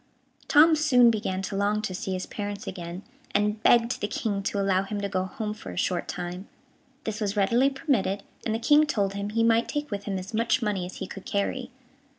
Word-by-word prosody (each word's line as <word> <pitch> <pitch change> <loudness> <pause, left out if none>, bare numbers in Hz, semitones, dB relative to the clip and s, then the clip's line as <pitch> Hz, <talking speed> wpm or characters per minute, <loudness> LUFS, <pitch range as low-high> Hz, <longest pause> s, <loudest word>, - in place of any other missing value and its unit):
Tom 315 +2 +7
soon 250 -6 +5
began 190 -3 -2
to 195 - -4
long 205 +1 +1
to 195 - -3
see 190 +1 -3
his 185 0 -3
parents 205 -1 -5
again, 175 0 -6 0.3
and 210 +1 +1
begged 235 +1 +4
the 205 - 0
King 205 -1 -2
to 200 +1 -2
allow 195 -1 +2
him 205 +1 -4
to 200 - -1
go 185 -2 -1
home 215 +1 -4
for 210 - -10
a 90 - -8
short 180 - 0
time. 180 +2 -5 0.6
This 220 0 -4
was 205 0 -1
readily 235 +7 +4
permitted, 255 -9 0 0.2
and 220 - -1
the - - +1
King 295 +6 +4
told 200 -8 0
him 200 0 -3
he 230 +2 +1
might 230 0 +3
take 295 -2 -3
with 200 -1 -4
him 195 -2 -2
as 185 +3 -7
much 230 +3 +2
money 205 -6 -1
as 185 - -10
he - - -5
could 195 +1 -9
carry. 245 +5 -1
205 Hz, 220 wpm, -26 LUFS, 195-230 Hz, 0.6 s, Tom